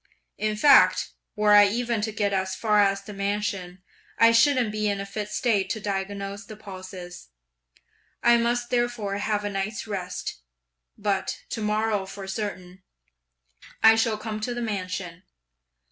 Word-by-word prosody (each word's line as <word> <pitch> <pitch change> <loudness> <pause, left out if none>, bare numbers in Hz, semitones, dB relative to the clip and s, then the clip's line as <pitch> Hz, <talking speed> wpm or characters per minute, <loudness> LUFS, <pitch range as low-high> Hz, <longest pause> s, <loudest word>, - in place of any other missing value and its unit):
In 215 0 0
fact 280 +5 +5 0.2
were 210 -1 +3
I 205 0 +8
even 235 +1 -1
to 220 +1 -2
get 205 -2 -1
as 190 -1 -1
far 210 +1 +2
as 195 -1 +2
the 210 - -9
mansion, 200 -2 -3 0.3
I 230 0 +6
shouldn't 245 -1 +4
be 215 0 -1
in 200 -1 -1
a 195 - -4
fit 205 +1 -5
state 210 -3 0
to 220 - -2
diagnose 200 0 -4
the 215 +1 -10
pulses! 185 - -10 1.0
I 240 0 +6
must 240 +1 0
therefore 240 -5 -1
have 210 0 -1
a - - -1
night's 200 +2 -3
rest, 180 - -5 0.6
but, 200 -2 -2
to 225 - -3
morrow 210 -2 0
for 195 0 -8
certain, 190 -2 -5 1.0
I 220 - +9
shall 225 -1 +1
come 215 0 -5
to 240 +3 -3
the 240 - -3
mansion. 185 -4 -4
205 Hz, 155 wpm, -25 LUFS, 195-220 Hz, 1.0 s, I